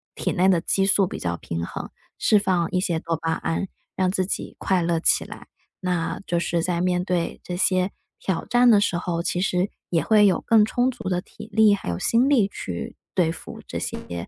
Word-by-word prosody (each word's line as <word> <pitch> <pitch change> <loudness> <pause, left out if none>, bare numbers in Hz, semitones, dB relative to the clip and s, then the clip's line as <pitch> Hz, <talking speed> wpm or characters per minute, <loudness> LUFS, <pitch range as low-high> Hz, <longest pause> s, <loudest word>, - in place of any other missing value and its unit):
体 - - -2
内 185 +2 +3
的 180 - +4
激 195 +3 +1
素 195 -1 +3
比 - - -6
较 85 -1 -2
平 85 0 -4
衡。 - - -6 0.3
释 210 - +4
放 185 -4 +1
一 180 - +1
些 170 -3 0
多 165 0 -2
巴 165 +1 -2
胺， 165 +4 -2 0.3
让 185 -1 +1
自 185 -1 0
己 190 - -4
快 190 -2 +1
乐 170 -1 +1
起 - - +3
来。 - - -11 0.3
那， 180 -3 -2
就 175 - +1
是 170 0 0
在 175 0 -1
面 180 0 +1
对 180 -3 -1
这 180 - -5
些 185 +1 +2 0.3
挑 185 -4 -2
战 245 0 +4
的 210 -3 +6
时 180 -4 +1
候， 170 -1 -2
其 175 - -1
实 185 0 0 0.2
也 165 -2 +1
会 210 -2 +5
有 190 -4 +3
更 220 -2 +5
充 245 +4 +1
足 230 -5 -8
的 180 -1 0
体 215 +3 -12
力， 220 -2 +6
还 200 - -4
有 85 - -2
心 235 - +2
力 235 -9 +3
去 90 - -6 0.2
对 170 -4 +3
付 165 - -9
这 - - -5
些， 85 0 -5
180 Hz, 235 characters per minute, -24 LUFS, 170-200 Hz, 0.3 s, 的